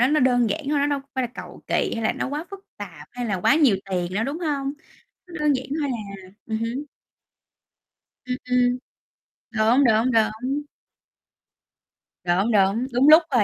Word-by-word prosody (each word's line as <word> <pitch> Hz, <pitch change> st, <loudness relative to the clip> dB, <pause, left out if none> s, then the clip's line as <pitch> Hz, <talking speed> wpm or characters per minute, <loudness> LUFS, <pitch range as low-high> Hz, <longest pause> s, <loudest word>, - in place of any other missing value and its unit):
nó 245 Hz, -, +5 dB
nó 300 Hz, +1 st, +2 dB
đơn 245 Hz, -3 st, +3 dB
giản 310 Hz, -, -2 dB
thôi, 295 Hz, -, +2 dB
nó 285 Hz, -, +2 dB
đâu 285 Hz, -1 st, -1 dB
có 275 Hz, -, -23 dB
phải 260 Hz, -, 0 dB
là -, -, -3 dB
cầu -, -, -10 dB
kỳ, -, -, 0 dB
hay 225 Hz, -, -3 dB
là 220 Hz, -, +2 dB
nó 265 Hz, -, -3 dB
quá 295 Hz, +3 st, -4 dB
phức 395 Hz, -1 st, -8 dB, 0.2 s
tạp, 165 Hz, -7 st, -9 dB
hay 245 Hz, -1 st, -4 dB
là 195 Hz, -4 st, -1 dB
quá 275 Hz, -, +4 dB
nhiều 275 Hz, -11 st, +4 dB
tiền 180 Hz, 0 st, -2 dB
đâu, 225 Hz, +3 st, 0 dB
đúng 285 Hz, +5 st, -3 dB
hông? 280 Hz, -5 st, -2 dB, 0.6 s
Nó 340 Hz, -3 st, -8 dB
đơn 300 Hz, -1 st, +3 dB
giản 260 Hz, -, -4 dB, 0.2 s
thôi 285 Hz, -, -1 dB
à. 200 Hz, -5 st, -7 dB
Ừm 220 Hz, -1 st, -2 dB
hứm. 240 Hz, +6 st, -3 dB, 1.4 s
Ừm, 250 Hz, 0 st, -2 dB
ừm. 250 Hz, 0 st, +3 dB, 0.7 s
Đúng, 230 Hz, +5 st, +3 dB
đúng, 225 Hz, +2 st, +3 dB
đúng. 235 Hz, +6 st, +1 dB, 1.6 s
Đúng, 185 Hz, +6 st, +1 dB
đúng, 205 Hz, +5 st, +2 dB
đúng 265 Hz, +5 st, +5 dB
lúc 320 Hz, +2 st, +9 dB
thôi, 240 Hz, -5 st, +4 dB
245 Hz, 190 wpm, -23 LUFS, 215-280 Hz, 1.6 s, lúc